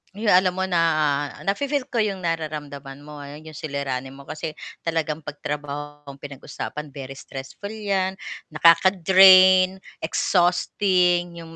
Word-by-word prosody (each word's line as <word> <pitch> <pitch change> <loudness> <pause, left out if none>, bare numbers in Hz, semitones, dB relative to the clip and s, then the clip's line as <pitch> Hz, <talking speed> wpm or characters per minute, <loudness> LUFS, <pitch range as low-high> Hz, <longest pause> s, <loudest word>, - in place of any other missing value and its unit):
Uy, 215 +2 -4
alam 185 -1 +5
mo 190 - 0
na 175 -2 +1 0.7
nafi-feel 280 +6 -1
ko - - -12
'yong 200 -3 -3
nararamdaman 150 -5 -5
mo, 145 0 -11
ah, 140 - -9
'yong 155 +1 -11
suliranin 135 -3 -4
mo 140 +1 -14
kasi 155 0 -5 0.3
talagang 160 -2 -2
pag 145 0 -9
trabaho 145 0 -6
ang 140 -1 -12
pinag-usapan, 145 +1 -8
very 135 -1 -8
stressful 135 +9 -9
'yan, 195 -3 -2 0.3
nakaka-drain, 185 +3 +6 0.2
exhausting 180 0 +1
'yong 165 0 -11
165 Hz, 130 wpm, -23 LUFS, 145-185 Hz, 0.7 s, nakaka-drain